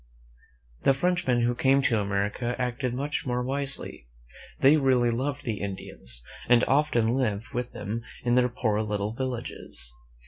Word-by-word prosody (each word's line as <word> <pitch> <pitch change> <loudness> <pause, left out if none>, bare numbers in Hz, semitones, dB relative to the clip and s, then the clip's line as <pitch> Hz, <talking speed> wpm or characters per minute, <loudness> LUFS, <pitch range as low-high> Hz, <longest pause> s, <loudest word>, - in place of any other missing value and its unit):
The 135 - +4
Frenchmen 175 -6 +1
who 120 +1 +2
came 135 +2 +3
to 115 -4 +3
America 105 +4 -1
acted 125 0 -1
much 145 +1 -2
more 125 0 0
wisely. 135 - 0 0.5
They 140 +3 +6
really 130 -5 +3
loved 140 +4 -2
the 115 -6 -3
Indians, 65 -11 -5 0.3
and 120 -1 +6
often 135 -5 +2
lived 115 -5 -1
with 125 -2 -4
them 105 +3 -4 0.2
in 120 -1 +1
their 125 0 +4
poor 110 -3 0
little 105 0 -2
villages. 120 - -3
125 Hz, 145 wpm, -27 LUFS, 110-135 Hz, 0.5 s, They